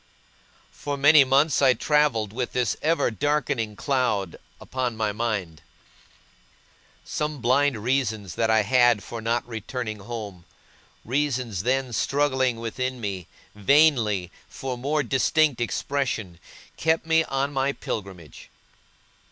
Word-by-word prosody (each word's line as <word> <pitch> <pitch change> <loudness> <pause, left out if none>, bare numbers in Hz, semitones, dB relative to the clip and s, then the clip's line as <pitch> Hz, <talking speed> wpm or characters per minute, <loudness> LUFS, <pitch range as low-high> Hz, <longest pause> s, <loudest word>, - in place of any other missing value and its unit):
For 145 -1 -5
many 145 +1 +7
months 140 +4 +2
I 130 -2 +5
travelled 130 -7 +1
with 125 +1 -3
this 125 -5 0
ever 160 -5 +1
darkening 140 -4 -1
cloud 120 - -1 0.2
upon 125 -3 -3
my 110 -1 0
mind. 100 -8 -3 1.4
Some 150 -1 -3
blind 130 -1 +2
reasons 110 -6 -1
that 115 -1 0
I 110 -1 +4
had 120 -1 +3
for 115 -1 -7
not 115 +2 -1
returning 110 -1 -5
home 100 -5 -7 0.6
reasons 125 -6 -1
then 130 +2 0
struggling 130 -3 +1
within 125 +3 -3
me, 95 -6 -5 0.3
vainly, 105 - +3 0.2
for 130 -1 -5
more 145 +5 -1
distinct 135 +2 +2
expression 120 -8 -2 0.4
kept 160 +1 +1
me 160 0 +3
on 135 +1 -2
my 135 0 +1
pilgrimage. 95 - -7
125 Hz, 120 wpm, -25 LUFS, 110-140 Hz, 1.4 s, many